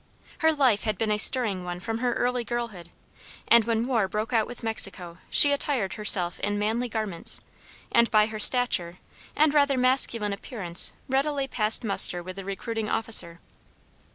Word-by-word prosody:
Her 320 -1 +2
life 265 -9 0
had 215 -3 -3
been 220 +1 -2
a 210 - -1
stirring 210 -7 +4
one 175 0 -7
from 225 +4 -6
her 245 0 -2
early 245 0 -2
girlhood, 230 -8 -7 0.6
and, 235 -2 +4
when 230 0 -2
war 230 -6 -1
broke 215 +5 -5
out 225 -2 0
with 245 - -12
Mexico, 185 -6 -2
she 290 - +7
attired 270 -9 -2
herself 185 -5 +4
in 205 0 -3
manly 225 +4 -3
garments, 215 -6 -2 0.5
and 235 0 +2
by 215 -1 +2
her 215 0 -8
stature 205 -8 +5 0.4
and 305 0 +1
rather 285 -2 +1
masculine 250 -5 0
appearance 195 -5 -4
readily 275 +1 -2
passed 220 -3 -2
muster 185 -4 +2
with 185 +1 -10
the 195 - -8
recruiting 215 +3 -6
officer. 195 -7 -2
220 Hz, 165 wpm, -24 LUFS, 195-245 Hz, 0.6 s, she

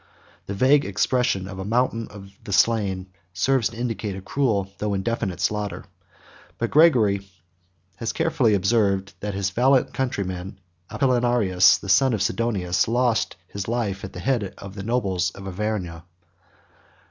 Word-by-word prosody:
The 100 - -4
vague 135 +7 +4
expression 100 -1 0
of 95 -1 -8
a - - -3
mountain 115 +1 0
of 100 -1 -12
the 105 - -8
slain, 95 -3 +1 0.2
serves 120 +6 +1
to 115 - -12
indicate 115 -4 -3
a - - -6
cruel 100 -6 0
though 105 -1 -1
indefinite 95 -3 -2
slaughter; 105 +2 -2 0.7
but 115 - -2
Gregory 110 -11 +4 0.7
has 115 - -2
carefully 135 -10 +2
observed, 100 -1 +1
that 105 -1 -4
his 95 -1 -1
valiant 130 +5 +3
countryman 95 -7 -3 0.3
Apollinaris, 120 -8 +3
the - - -10
son 130 +5 +4
of 100 - -1
Sidonius, 95 -4 0
lost 120 -2 +1
his 100 -1 -6
life 110 -5 -2
at - - -7
the 90 - -7
head 105 -1 -1
of 100 -1 -9
the 100 - -7
nobles 95 -6 0
of 95 0 -9
Auvergne. 95 -4 -3
105 Hz, 145 wpm, -23 LUFS, 95-120 Hz, 0.7 s, vague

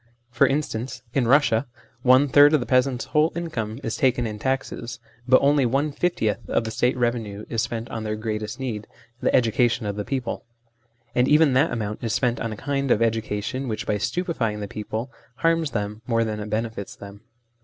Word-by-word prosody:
For 120 - +4
instance, 135 -4 -2
in 135 -3 +2
Eussia 130 -1 +3 0.3
one 130 +3 +5
third 145 +3 +7
of - - +3
the 120 - -3
peasants' 130 -1 +2
whole 155 +2 +2
income 125 -10 -4
is 115 - -3
taken 125 -2 +2
in 105 -2 -5
taxes, 125 -1 -3 0.3
but 130 0 +7
only 140 0 +4
one 135 +5 +1
fiftieth 140 - 0
of - - +1
the 110 - -4
State 125 +3 +1
revenue 115 -4 -2
is 115 - 0
spent 115 0 -3
on 115 - -4
their 110 0 -2
greatest 110 +2 -4
need, 115 -5 -4 0.3
the - - +2
education 120 -1 +2
of 100 -1 -2
the 105 - -2
people; 130 +1 -3 0.7
and 125 +1 +3
even 150 -2 +5
that 140 +5 +4
amount 105 -2 -4
is 115 - -1
spent 125 -3 +1
on 115 - -2
a 110 - -6
kind 140 +1 -2
of 105 - +4
educa 110 -2 0
tion 130 +4 -3
which, 110 -2 -3
by 105 - 0
stupefying 115 - -1
the 105 - -4
people, 110 +4 -5 0.2
harms 165 +1 +1
them 105 -2 -4
more 115 -2 +2
than 110 -1 -3
it 105 0 -5
benefits 110 -2 -3
them. 100 0 -11
120 Hz, 195 wpm, -24 LUFS, 110-135 Hz, 0.7 s, third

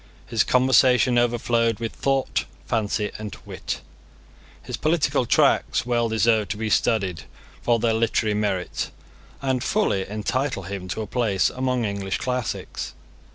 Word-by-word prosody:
His 115 -2 +2
conversation 125 -1 +4
overflowed 115 -1 +1
with 115 -1 -3
thought, 135 -1 0 0.2
fancy, 105 -2 -1
and 105 -2 -6
wit. - - -5 0.8
His - - -4
political 150 -5 +1
tracts - - +3
well 120 -1 +1
deserve 110 -1 +2
to 105 - -3
be 110 0 -2
studied 95 -8 +1 0.4
for 120 -1 +3
their 115 0 +1
literary 110 -1 +1
merit, 100 -3 -1 0.5
and 130 -2 0
fully 100 - 0
entitle 110 +2 -1
him 95 0 -6
to 110 +4 -3
a - - -5
place 105 -6 +1
among 130 -2 -1
English 100 -2 -2
classics. 125 -3 -3
115 Hz, 135 wpm, -24 LUFS, 105-125 Hz, 0.8 s, conversation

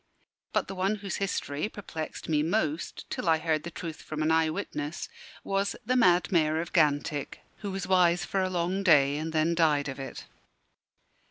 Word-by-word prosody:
But - - 0
the - - -5
one 190 +3 0
whose 200 -2 -4
history 185 -3 -2
perplexed 160 -7 -6
me 150 -2 +2
most, 160 -2 -1
till 170 - -1
I 160 - +5
heard 155 -1 0
the 170 - -6
truth 165 -2 -7
from 155 0 -4
an 155 - +2
eye 160 0 +3
witness, 155 -3 -4 0.4
was 195 +1 0
"the 255 +3 +1
mad 180 -7 +4
Mayor 160 -3 +3
of 170 +1 -5
Gantick, 145 -3 +1 0.2
who 205 - -5
was 195 -1 -3
wise 180 -2 +3
for 195 - 0
a 185 - 0
long 180 +2 -1
day, 145 -6 +5
and 160 +1 -3
then 160 +1 +2
died 155 -4 +2
of 135 0 -5
it." 135 -2 -7
165 Hz, 185 wpm, -28 LUFS, 155-190 Hz, 0.4 s, I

